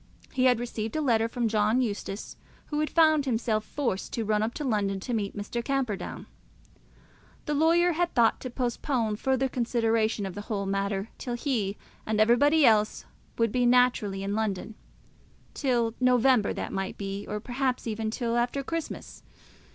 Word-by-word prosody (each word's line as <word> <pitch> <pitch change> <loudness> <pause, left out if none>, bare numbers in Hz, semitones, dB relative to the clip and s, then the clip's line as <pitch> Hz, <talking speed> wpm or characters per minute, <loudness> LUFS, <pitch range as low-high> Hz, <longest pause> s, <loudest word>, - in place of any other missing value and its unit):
He 255 0 +2
had 250 -2 +4
received 225 -1 -4
a - - +1
letter 230 -5 +2
from 235 0 -1
John 215 +2 +2
Eustace, 205 -4 -3 0.4
who 295 - 0
had 305 - 0
found 315 -3 +4
himself 225 -3 0
forced 235 -10 -3
to 230 - -2
run 210 0 +1
up 220 +2 -2
to 300 - -4
London 205 -6 0
to 245 - -4
meet 205 -2 -2
Mr. 220 +4 -4
Camperdown. 255 -7 -2 1.2
The 300 - -1
lawyer 335 +4 +4
had 345 +1 0
thought 230 -2 +4
to 255 - -6
postpone 240 -2 -1
further 265 +2 +1
consideration 225 -4 0
of 190 - -5
the 205 - -6
whole 205 -1 -3
matter 195 +1 -1
till 245 -2 -3
he 230 -6 -1 0.3
and 215 0 -1
everybody 285 +7 +5
else 215 -2 +3 0.3
would 230 -2 +2
be 245 +1 +2
naturally 240 -6 +3
in 200 +1 -2
London, 215 -1 -2 0.8
till 240 -5 0
November 250 -3 +4
that - - -4
might 195 0 -3
be, 200 0 -5
or, 210 - -2
perhaps, 250 +3 -2
even 220 -1 -2
till 235 +1 -1
after 245 +3 0
Christmas. 330 +2 -5
230 Hz, 165 wpm, -27 LUFS, 210-255 Hz, 1.2 s, everybody